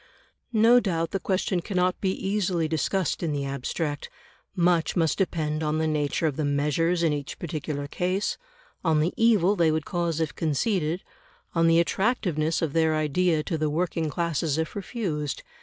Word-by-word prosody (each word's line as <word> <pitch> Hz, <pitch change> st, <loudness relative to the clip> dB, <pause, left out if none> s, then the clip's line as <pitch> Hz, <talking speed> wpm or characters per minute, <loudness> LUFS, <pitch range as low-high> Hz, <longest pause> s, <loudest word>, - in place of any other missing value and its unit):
No 230 Hz, +3 st, +6 dB
doubt 165 Hz, -7 st, -1 dB
the 195 Hz, -, -1 dB
question 185 Hz, -1 st, 0 dB
cannot 180 Hz, -1 st, 0 dB
be 190 Hz, -, +1 dB
easily 190 Hz, -4 st, 0 dB
discussed 165 Hz, +3 st, -1 dB
in 165 Hz, -4 st, -1 dB
the 140 Hz, -1 st, -2 dB
abstract; 145 Hz, +2 st, -3 dB, 0.5 s
much 175 Hz, -2 st, +2 dB
must 165 Hz, -1 st, +1 dB
depend 155 Hz, -5 st, -1 dB
on 155 Hz, 0 st, 0 dB
the 160 Hz, -, +1 dB
nature 150 Hz, 0 st, 0 dB
of 150 Hz, -4 st, 0 dB
the 155 Hz, -, 0 dB
measures 150 Hz, +5 st, +1 dB
in 160 Hz, -3 st, +3 dB
each 145 Hz, -1 st, -5 dB
particular 150 Hz, -3 st, -4 dB
case; 185 Hz, +7 st, -1 dB, 0.4 s
on 160 Hz, -3 st, +3 dB
the 160 Hz, +4 st, +1 dB
evil 210 Hz, -4 st, +4 dB
they 170 Hz, -4 st, +3 dB
would 155 Hz, -1 st, 0 dB
cause 170 Hz, -3 st, -1 dB
if 160 Hz, -1 st, -1 dB
conceded; 165 Hz, -, 0 dB, 0.5 s
on 165 Hz, -1 st, +3 dB
the 165 Hz, 0 st, +5 dB
attractiveness 170 Hz, -, 0 dB
of 150 Hz, -4 st, -1 dB
their 160 Hz, -1 st, +3 dB
idea 155 Hz, +1 st, +1 dB
to 165 Hz, -2 st, -3 dB
the 155 Hz, -1 st, +1 dB
working 165 Hz, 0 st, -1 dB
classes 160 Hz, -1 st, -1 dB
if 160 Hz, 0 st, -2 dB
refused. 180 Hz, -, -3 dB
165 Hz, 170 wpm, -26 LUFS, 155-180 Hz, 0.5 s, No